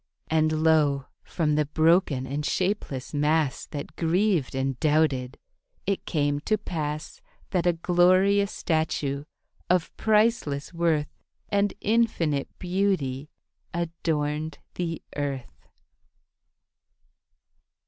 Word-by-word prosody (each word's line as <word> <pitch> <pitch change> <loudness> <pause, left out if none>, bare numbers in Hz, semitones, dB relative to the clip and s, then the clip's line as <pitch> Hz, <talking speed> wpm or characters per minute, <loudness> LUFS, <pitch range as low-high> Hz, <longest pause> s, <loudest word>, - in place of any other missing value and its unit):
And 155 0 +2
lo! 150 -4 +3 0.2
from 155 -3 0
the 150 -1 +1
broken 155 -3 +3
and 140 +3 -3
shapeless 180 -8 -2
mass 150 -1 +1
That 145 -1 -7
grieved 175 - +1
and 135 -1 -1
doubted, 145 -4 +1 0.5
it 195 0 -2
came 145 -3 +1
to 215 +8 0
pass 155 -6 -4 0.3
That 180 -1 +1
a 175 - +4
glorious 185 +4 +3
statue 150 -3 -1 0.4
of 180 -2 +1
priceless 210 -10 +1
worth 165 -3 0 0.3
And 200 0 +1
infinite 200 -10 +1
beauty 175 -8 -1 0.5
adorned 155 -3 -2 0.2
the 165 -2 -3
earth. 140 -3 -5
160 Hz, 95 wpm, -26 LUFS, 145-180 Hz, 0.5 s, a